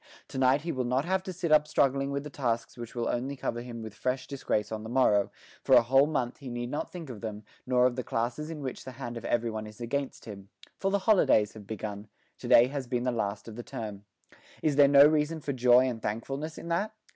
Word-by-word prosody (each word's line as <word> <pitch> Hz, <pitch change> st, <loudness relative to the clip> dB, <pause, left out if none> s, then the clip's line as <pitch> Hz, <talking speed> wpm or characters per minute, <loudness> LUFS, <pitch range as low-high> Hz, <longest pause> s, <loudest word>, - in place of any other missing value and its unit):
To 130 Hz, -, -5 dB
night 130 Hz, +2 st, +4 dB
he 165 Hz, +2 st, -3 dB
will 130 Hz, -3 st, -1 dB
not 125 Hz, +4 st, 0 dB
have 190 Hz, +1 st, +1 dB
to 185 Hz, -, -4 dB
sit 175 Hz, -2 st, -3 dB
up 150 Hz, 0 st, +5 dB
struggling 140 Hz, -2 st, +1 dB
with 140 Hz, 0 st, -2 dB
the 150 Hz, -, -8 dB
tasks 120 Hz, -4 st, -2 dB
which 120 Hz, -1 st, -9 dB
will 120 Hz, -1 st, -1 dB
only 130 Hz, +4 st, -2 dB
cover 120 Hz, -3 st, -3 dB
him 120 Hz, -2 st, -7 dB
with 110 Hz, -2 st, -8 dB
fresh 130 Hz, +4 st, -2 dB
disgrace 105 Hz, -6 st, -2 dB
on 110 Hz, -1 st, -4 dB
the 110 Hz, -, -7 dB
morrow; 110 Hz, -5 st, +3 dB, 0.3 s
for -, -, +5 dB
a -, -, +7 dB
whole 135 Hz, +4 st, +4 dB
month 130 Hz, -5 st, -2 dB
he 135 Hz, -3 st, -8 dB
need 120 Hz, 0 st, -4 dB
not 145 Hz, -, -3 dB
think 165 Hz, -7 st, -7 dB
of 110 Hz, -, -9 dB
them, 110 Hz, -2 st, -6 dB, 0.2 s
nor 125 Hz, -1 st, +4 dB
of 125 Hz, -1 st, +2 dB
the 125 Hz, -, -3 dB
classes 120 Hz, +8 st, -2 dB
in 155 Hz, -3 st, -6 dB
which 130 Hz, -2 st, -5 dB
the 130 Hz, -, -8 dB
hand 120 Hz, -2 st, -6 dB
of 115 Hz, -, -7 dB
everyone 115 Hz, -2 st, -1 dB
is 105 Hz, +1 st, -13 dB
against 135 Hz, +3 st, -3 dB
him. 100 Hz, -2 st, -10 dB, 0.3 s
For 195 Hz, -, +1 dB
the 200 Hz, -, +2 dB
holidays 110 Hz, -, +4 dB
have 105 Hz, -3 st, -12 dB
begun; 105 Hz, 0 st, -6 dB, 0.3 s
to -, -, -7 dB
day 120 Hz, -, +7 dB
has 135 Hz, 0 st, -4 dB
been 125 Hz, -1 st, -1 dB
the 125 Hz, -, +1 dB
last 105 Hz, -3 st, -3 dB
of 110 Hz, -, -8 dB
the 120 Hz, -, -5 dB
term. 105 Hz, -4 st, -7 dB, 0.6 s
Is 150 Hz, -2 st, +2 dB
there 145 Hz, 0 st, +7 dB
no 140 Hz, 0 st, +8 dB
reason 155 Hz, +1 st, +2 dB
for 140 Hz, -1 st, -3 dB
joy 125 Hz, 0 st, +5 dB
and 120 Hz, -3 st, -4 dB
thankfulness 135 Hz, +9 st, -4 dB
in 170 Hz, -, -8 dB
that? 205 Hz, +6 st, -1 dB
125 Hz, 250 wpm, -29 LUFS, 115-140 Hz, 0.6 s, no